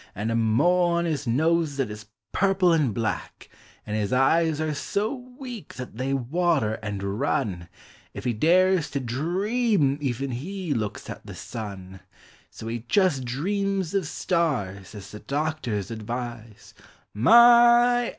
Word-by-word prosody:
And 105 +4 -2
a - - 0
mole 155 +11 +3
on 170 0 +1
his 145 -5 -2
nose 155 +4 +1
that 135 -6 -1
is 105 0 -9 0.2
purple 195 -2 +3
and 150 -7 +2
black; 110 0 -4 0.4
And 105 - -4
his 105 -2 -1
eyes 155 +4 +3
are 155 -1 -1
so 200 - -2 0.2
weak 245 - -8
that 125 -3 -8
they 130 +2 -2
water 135 -3 0
and 100 -1 -4
run 85 -4 -1 0.4
If - - -8
he 125 -2 0
dares 175 - +3
to 140 - -2
dream 170 - 0
even 135 0 -2
he 175 +6 -4
looks 110 -4 -4
at - - -8
the - - -8
sun 95 -4 -8 0.5
So - - -11
he 115 0 -4
jes' 185 -9 +3
dreams 190 +8 -2
of 195 -6 0
stars, 115 - -2
as 100 -1 -10
the 105 - -9
doctors 140 -9 -3
advise 115 -1 -7 0.2
— - - -36
My! 240 - +6
140 Hz, 150 wpm, -25 LUFS, 110-180 Hz, 0.5 s, My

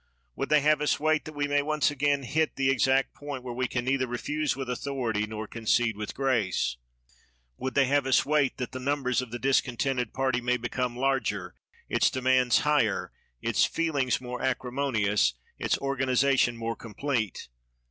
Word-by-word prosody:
Would - - -3
they 150 -1 +5
have 150 +1 +3
us 150 - +1
wait, 155 +1 +1
that 155 - -9
we 145 0 0
may 145 0 +2
once 150 0 +1
again 145 0 +1
hit 155 +5 0
the 135 -1 +2
exact 135 +1 +2
point 145 -3 -7
where 125 -1 -5
we 125 +1 -1
can 120 0 -3
neither 130 0 +1
refuse 150 +5 -2
with 135 -1 -5
authority 125 -4 -2
nor 110 0 -5
concede 115 +1 0
with 105 0 -6
grace? 110 - 0 0.8
Would 130 +1 -4
they 140 - +5
have 140 0 +1
us 130 - +3
wait, 145 -2 +1
that 125 - -4
the 130 - -6
numbers 130 -2 0
of 125 - -7
the 120 - -5
discontented 130 -2 0
party 130 -2 0
may 125 +1 +1
become 120 +1 -3
larger, 135 +1 -1 0.3
its - - +3
demands 130 -1 +3
higher, 145 -8 +1 0.3
its - - +2
feelings 145 -7 0
more 125 0 -6
acrimonious, 125 - +1 0.2
its - - +1
organization 135 -2 +1
more 115 0 -3
complete? 115 -2 -3
130 Hz, 170 wpm, -28 LUFS, 120-140 Hz, 0.8 s, they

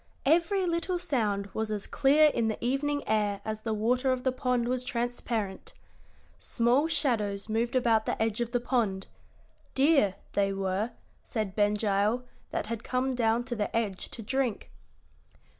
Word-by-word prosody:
Every 345 +6 +3
little 340 +1 0
sound 215 - -1
was 220 0 -2
as 210 -2 -3
clear 300 +3 +4
in 235 -5 0
the 220 - -1
evening 285 +4 0
air 210 -2 +1
as 215 0 -4
the 225 - -3
water 245 +5 +1
of 255 -1 -1
the 260 - +2
pond 250 -2 0
was 250 0 -1
transparent. 235 -5 -3 0.6
Small 245 +6 +2
shadows 215 -11 0
moved 230 +3 -1
about 230 -3 +3
the - - -1
edge 225 +1 0
of 235 0 -2
the 245 - +1
pond 225 -6 0 0.7
deer, 270 - +4 0.2
they 195 -1 +1
were, 195 +3 -1 0.3
said 215 -4 -3
Ben 205 0 +3
Gile, 210 +3 +1 0.3
that - - -2
had 230 +1 -4
come 260 +1 0
down 230 -1 +1
to 240 -1 -4
the 210 -1 -2
edge 205 -5 -2
to 225 - -8
drink. 255 -1 -2
235 Hz, 160 wpm, -29 LUFS, 210-260 Hz, 0.7 s, clear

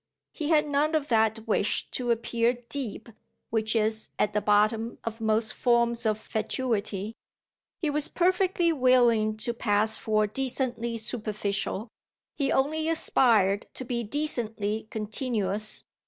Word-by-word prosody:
He 305 -2 -4
had 305 -2 +4
none 295 +2 +1
of 300 -2 -1
that 220 -1 +2
wish 210 -1 +1
to 245 -2 -3
appear 235 +1 +1 0.2
deep 240 -5 -4 0.4
which 220 0 0
is 220 0 +1
at 210 - +1
the 210 - +1
bottom 215 +3 +2
of 225 0 -5
most 220 0 +1
forms 235 -1 +2
of 215 -1 +1
fatuity; 215 -2 -2 0.6
he 310 -4 -1
was 295 0 +1
perfectly 360 -1 +2
willing 240 -5 +3
to 235 +2 -2
pass 220 -1 +1
for 215 -1 +1
decently 240 0 -2
superficial; 210 -2 -3 0.5
he 275 -2 0
only 310 +4 +1
aspired 220 -10 +3
to 260 - -5
be 240 -1 -2
decently 220 -5 -2
continuous. 215 -2 -2
230 Hz, 130 wpm, -27 LUFS, 215-260 Hz, 0.6 s, had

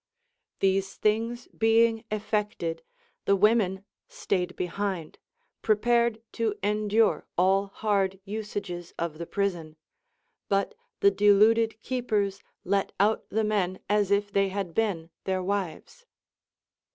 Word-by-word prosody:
These 195 0 +1
things 230 +3 0
being 225 0 +3
eifected, 210 -6 -2 0.5
the 200 - +4
women 200 -2 +2 0.2
stayed 180 -2 -2
behind, 180 -2 -3 0.4
prepared 230 +1 +2
to 225 -2 -1
endure 210 +1 +2
all 190 +2 +3
hard 195 -2 0
usages 205 -4 -5
of 165 -2 -3
the 170 - -5
prison, 175 -6 -2 0.7
but 195 0 +1 0.3
the 200 - +6
deluded 215 +3 +4
keepers 210 -6 -1 0.2
let 195 +1 0
out 210 +3 +2
the 220 +3 0
men 195 -4 0
as 205 -1 +2
if 205 0 +1
they 195 -1 +2
had 190 -3 -4
been 175 -7 -1
their 185 -1 -1
wives. 200 - -4
200 Hz, 115 wpm, -27 LUFS, 190-215 Hz, 0.7 s, the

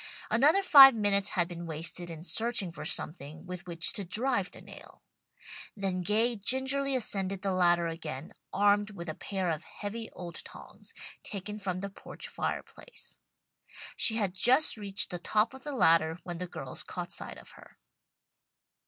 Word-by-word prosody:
Another 300 +11 +4
five 270 -7 +9
minutes 205 -1 +2
had 175 -3 0
been 170 -1 -8
wasted 165 +2 -4
in 165 -1 -9
searching 220 -1 +1
for 150 -2 -9
something 155 +1 -3
with 180 -1 -8
which 165 -1 +1
to 200 - -3
drive 205 +2 -1
the - - -14
nail. - - -15 0.7
Then 190 -2 -2
Gay 220 +6 +1
gingerly 265 +5 +3
ascended 195 -5 -2
the 195 - 0
ladder 175 -2 +2
again, 160 -3 -6 0.2
armed 205 +1 +2
with 175 -4 -9
a - - -3
pair 190 +1 -4
of 155 - -4
heavy 220 +2 -7
old 170 -2 -6
tongs, - - -12 0.3
taken 210 +1 -7
from 185 -2 -4
the 200 - -5
porch - - -11
fireplace. - - -7 0.8
She 225 - +5
had 200 -5 -1
just 255 +10 +4
reached 200 -3 -2
the 175 - -5
top 215 +6 0
of 265 - -13
the 295 - -5
ladder 165 -6 +3
when 175 -1 -6
the 180 - -5
girls 135 -6 -6
caught 175 -1 -7
sight - - -4
of - - -14
her. - - -18
195 Hz, 165 wpm, -29 LUFS, 175-220 Hz, 0.8 s, five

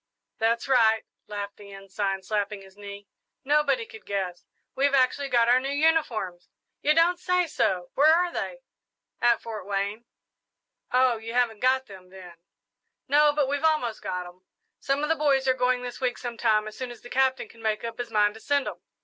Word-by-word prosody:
"That's 230 +2 +1
right," 225 -4 +4 0.2
laughed 205 -1 -6
the 200 -1 -13
Ensign, 195 0 -3
slapping 205 0 -2
his 190 0 -17
knee; 200 0 -10 0.4
"nobody 300 - +2
could 445 -1 -13
guess. 185 -3 -4 0.3
We've 280 +1 +2
actually 275 +2 +2
got 235 -2 +3
our 245 +1 +5
new 270 +1 -4
uniforms!" 280 - 0 0.3
"You 300 +1 +3
don't 345 +2 +3
say 360 0 +1
so! 185 - -1
Where 300 +3 +5
are 350 +2 +3
they?" - - -4 0.6
"At 240 -1 +3
Fort 220 -4 -7
Wayne." 200 +3 -2 0.9
"Oh, 255 -1 +3
you 225 +1 -7
haven't 235 -4 +1
got 260 +2 +2
them, 190 -4 -13
then?" 180 -2 -12 0.7
"No, 295 +2 +5
but 290 -2 +1
we've 285 +2 -2
almost 305 -9 +1
got 180 0 -4
'em. 180 +1 -14 0.4
Some 275 +2 -1
of 300 - -1
the 325 - +3
boys 275 -3 +2
are 260 - +5
going 250 0 +1
this 245 +1 -7
week 250 -1 0
sometime, 230 -3 0
as 215 - -8
soon 255 -1 -5
as 240 - -11
the 245 - -12
Captain 265 -2 +1
can 230 - -17
make 220 -1 -1
up 230 0 -6
his 245 - -4
mind 210 -1 +2
to 220 - -12
send 285 +3 0
'em. - - -6
240 Hz, 190 wpm, -26 LUFS, 205-280 Hz, 0.9 s, our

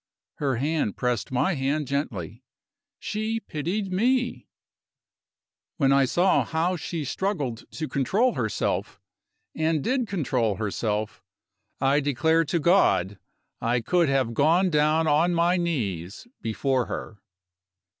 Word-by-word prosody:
Her 140 -3 0
hand 145 -4 -1
pressed 125 -3 -1
my 130 +9 +1
hand 145 +1 -1
gently 120 - -3 0.6
she 220 +1 -2
pitied 185 +3 -3
me. 245 +5 0 1.3
When 135 -4 +3
I 140 -1 +4
saw 175 +8 +3
how 165 +3 0
she 165 -2 -4
struggled 145 - -3
to 155 - -4
control 195 - +1
herself, 110 -4 -2 0.5
and 155 -2 0
did 255 -1 0
control 130 - 0
herself, 105 0 -2 0.6
I 135 +2 +3
declare 155 +4 +2
to 170 +3 0
God 105 - +3 0.4
I 120 +2 +1
could 170 +6 +2
have 130 -4 +1
gone 170 +8 +3
down 155 +1 +3
on 160 +3 +3
my 170 +2 +3
knees 105 - -3
before 125 +3 0
her. 105 -3 -6
150 Hz, 120 wpm, -25 LUFS, 125-175 Hz, 1.3 s, I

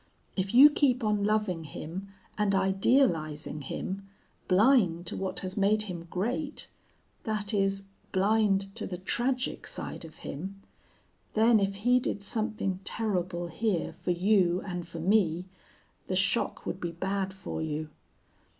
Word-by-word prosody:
If 195 +3 -1
you 285 +4 +10
keep 265 -5 +2
on 210 -2 +1
loving 210 -6 0
him 165 +5 -7 0.3
and 205 -2 +1
idealizing 190 - +2
him, 195 +8 -5 0.4
blind 185 -4 +4
to - - -2
what 190 -1 -3
has 185 0 -5
made 210 +1 +3
him 175 -4 -7
great, 250 - -2 0.6
that 215 -1 -1
is, 195 -1 +1 0.3
blind 195 0 +2
to - - -1
the 180 - -5
tragic 250 +7 -1
side - - -5
of 160 -1 -11
him, 190 +7 -6 0.8
then 220 +1 +5
if 195 0 0
he 245 +5 +3
did 205 -4 -3
something 215 -3 -1
terrible 185 -5 -1
here 190 +1 -1
for - - -6
you 180 0 +3
and 175 -3 -4
for 170 -1 -7
me 180 -2 +2 0.6
the - - -1
shock - - +1
would - - -4
be 170 - -2
bad 190 +2 -2
for 190 -3 -5
you. 155 0 -3
195 Hz, 140 wpm, -29 LUFS, 180-215 Hz, 0.8 s, you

